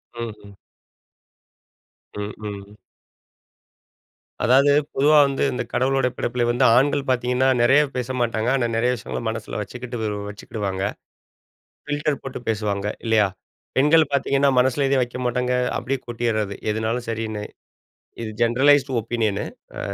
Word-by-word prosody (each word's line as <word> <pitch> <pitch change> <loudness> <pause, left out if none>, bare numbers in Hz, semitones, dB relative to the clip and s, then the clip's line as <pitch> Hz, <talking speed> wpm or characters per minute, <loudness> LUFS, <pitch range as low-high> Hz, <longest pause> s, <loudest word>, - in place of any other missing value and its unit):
ம்ஹ்ம். 110 -4 -8 1.6
ம்ஹ்ம். 105 -1 -6 1.8
அதாவது, 135 +5 +5 0.2
பொதுவா 150 +2 +5
வந்து 135 -1 -1
இந்த - - -2
கடவுளோட 130 +1 +2
படைப்பில 120 0 -1
வந்து 125 +2 +2
ஆண்கள் 140 +1 +2
பாத்தீங்கன்னா, 125 +1 +1
நெறைய 130 +5 +5
பேச 125 -1 -3
மாட்டாங்க. 115 -1 0
ஆனா, 125 -3 +1
நெறைய 120 +2 +2
விஷயங்கள 120 - -5
மனசில 110 -1 -5
வச்சுக்கிட்டு, 125 +4 -6 0.3
வச்சுகிடுவாங்க. 100 -2 -4 1.1
பில்டர் 145 -1 -1
போட்டு 135 -1 -6
பேசுவாங்க 105 -2 -1 0.2
இல்லையா? 110 -2 +4 0.5
பெண்கள் 150 +2 +5
பாத்தீங்கன்னா, 140 0 +2
மனசுல 130 +2 +2
எதுவும் 135 -1 +3
வக்க 120 +1 -7
மாட்டாங்க. 125 +1 0 0.2
அப்படியே 130 +2 -2
கொட்டிறது 115 -4 -1 0.2
எதுனாலும் 110 +3 -2
சரின்னு. 110 -2 -3 0.8
இது 115 - -4
ஜெனரலைஸ்ட் 135 +4 +4
ஒப்பீனியன்னு. 110 -3 -1 0.3
அ - - -5
120 Hz, 115 wpm, -22 LUFS, 110-135 Hz, 1.8 s, அதாவது